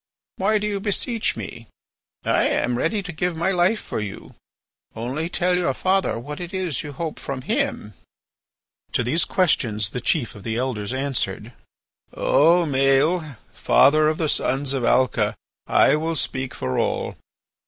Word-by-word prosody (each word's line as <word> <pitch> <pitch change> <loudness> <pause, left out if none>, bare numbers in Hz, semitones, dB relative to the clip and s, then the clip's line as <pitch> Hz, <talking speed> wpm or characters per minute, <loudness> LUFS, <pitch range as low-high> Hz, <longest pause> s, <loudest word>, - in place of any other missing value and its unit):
Why 210 +3 +2
do 210 - -2
you 205 -1 -1
beseech 220 +3 0
me? 115 - -8 0.6
I - - +3
am 120 0 0
ready 195 - 0
to 180 - -5
give 175 +1 -2
my 170 +4 0
life 190 +4 +2
for - - -5
you. 100 -3 -7 0.6
Only 130 +9 -3
tell 180 0 +1
your 170 -7 0
father 190 -7 +1
what 145 +6 -7
it 175 +1 -6
is 180 -8 -1
you 145 - -7
hope 160 +2 -5
from 130 -2 -5
him." 230 - -1 1.0
To 125 - +1
these 135 +9 +1
questions 110 - +1
the 125 - -4
chief 145 -9 0
of 105 - -12
the 110 +2 -3
Elders 120 -5 -2
answered: 130 -5 -2 0.6
"O 170 +4 +4
Maël, 140 +2 +2 0.2
father 155 +4 +4
of 155 0 +1
the 160 - 0
sons 140 -1 0
of 135 -3 -1
Alca, 130 +2 +2 0.3
I - - +5
will 160 +1 -2
speak 130 -3 -2
for 65 0 -2
all. - - -1
150 Hz, 160 wpm, -23 LUFS, 125-180 Hz, 1.0 s, I